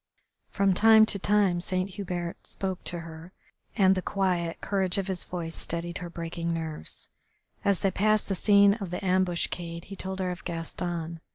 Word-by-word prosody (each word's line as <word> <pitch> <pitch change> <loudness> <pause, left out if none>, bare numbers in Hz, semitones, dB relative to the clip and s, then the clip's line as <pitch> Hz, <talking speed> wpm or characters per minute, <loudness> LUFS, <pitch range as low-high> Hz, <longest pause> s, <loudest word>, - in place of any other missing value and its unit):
From 195 -1 +2
time 220 +3 +7
to 200 - 0
time 195 -3 +2
Saint 185 +2 -1
Hubert 180 -3 -5
spoke 190 -1 -4
to 175 -1 -2
her, 165 +2 -10 0.4
and 190 -2 +6
the 185 - -1
quiet 180 -4 -1
courage 190 -2 0
of 195 - 0
his 190 -2 -3
voice 165 -2 -5
steadied 170 +1 -3
her 175 -2 -6
breaking 170 0 -4
nerves. 160 - -5 0.6
As 200 -3 +2
they 195 - +2
passed 215 +3 +2
the 195 - 0
scene 200 +1 +5
of 200 -4 -5
the 180 +3 -4
ambuscade 175 -2 0
he 195 - -8
told 190 0 -5
her 185 -1 -1
of 180 - -7
Gaston. 170 -1 -4
185 Hz, 175 wpm, -28 LUFS, 170-195 Hz, 0.6 s, time